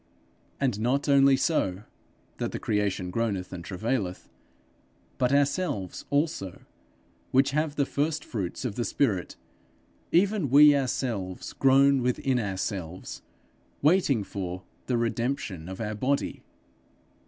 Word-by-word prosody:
'And 125 -7 0
not 130 +6 0
only 140 -1 +5
so' 100 - 0 0.5
that - - -2
the - - -3
creation 100 -4 -1
groaneth 100 -5 -2
and 85 -2 -6
travaileth 100 0 -3 0.9
'but 125 -1 +2
ourselves 140 - 0
also, 145 - -1 0.7
which 135 +2 +3
have 150 0 0
the 140 - +2
first 150 +2 -1
fruits 100 +2 -4
of 120 - -2
the 120 - -2
spirit, 105 -9 0 0.8
even 190 -3 +2
we 145 +2 +8
ourselves 120 -8 -2
groan 135 0 +4
within 125 +1 0
ourselves, 95 -4 -4 0.6
waiting 150 - +3
for.... 90 -2 -5 0.2
the 125 - +1
redemption 115 -7 -2
of 95 - -7
our 105 -1 -3
body.' 130 +6 -1
125 Hz, 120 wpm, -27 LUFS, 100-140 Hz, 0.9 s, we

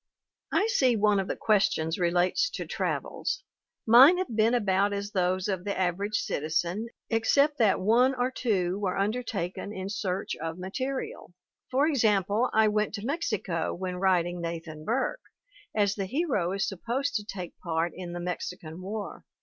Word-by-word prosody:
"I 410 - +3
see 265 - +3
one 210 -1 +3
of 190 - -2
the - - -2
questions 195 -6 +1
relates 180 - +2
to - - -4
travels. - - -2 0.4
Mine 260 +10 +8
have 365 -11 -3
been 225 +2 +3
about 200 -2 +2
as 200 0 -4
those 185 -1 0
of 190 -3 -2
the 200 0 -3
average 190 +3 0
citizen, 170 +8 -1 0.2
except 280 +6 +3
that 215 -5 +4
one 240 +7 +3
or 250 +1 0
two 195 -7 0
were 190 -3 -1
undertaken 200 -3 -2
in 190 -1 -5
search 195 -2 -2
of 165 +1 -5
ma 185 +1 -6
terial. 260 -5 -4 0.4
For 265 +3 +3
example, 220 - +2
I 220 0 +4
went 210 0 0
to 205 0 -6
Mexico 215 - -2
when 180 0 -4
writing 175 -2 +1
Nathan 165 -2 -6
Burke, 265 - -1 0.5
as 205 -2 +3
the 200 -2 -3
hero 260 - 0
is 195 0 0
supposed 245 +9 -2
to 210 - -6
take 190 -4 -7
part 165 0 -1
in 175 -1 -6
the 175 - -4
Mexican 175 -1 -5
War. 205 +2 -6
200 Hz, 165 wpm, -28 LUFS, 180-230 Hz, 0.5 s, Mine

